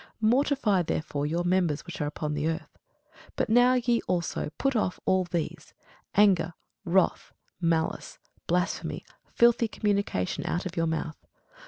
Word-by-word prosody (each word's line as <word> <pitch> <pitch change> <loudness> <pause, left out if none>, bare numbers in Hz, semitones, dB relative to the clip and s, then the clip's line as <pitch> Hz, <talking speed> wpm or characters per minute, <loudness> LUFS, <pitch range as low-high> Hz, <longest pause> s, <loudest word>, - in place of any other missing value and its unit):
Mortify 230 -3 +2
therefore 150 -3 -2
your 170 +3 -1
members 175 -4 +1
which 175 -3 -7
are 145 - 0
upon 150 0 -3
the 150 +1 -1
earth. 165 0 -4 0.6
But - - -1
now 245 +2 +5
ye 240 -1 +1
also 175 -4 -1
put 275 -1 0
off 210 -5 0
all 185 -1 +2
these; 170 -2 -4 0.4
anger, 185 -5 +4 0.3
wrath, 185 +1 +1 0.3
malice, 165 -1 -1 0.3
blasphemy, 180 +2 -1 0.2
filthy 235 -1 +3
communication 200 - -1
out 175 - -1
of 180 -1 -5
your 165 -1 +1
mouth. 160 -1 -3
180 Hz, 140 wpm, -27 LUFS, 160-215 Hz, 0.6 s, now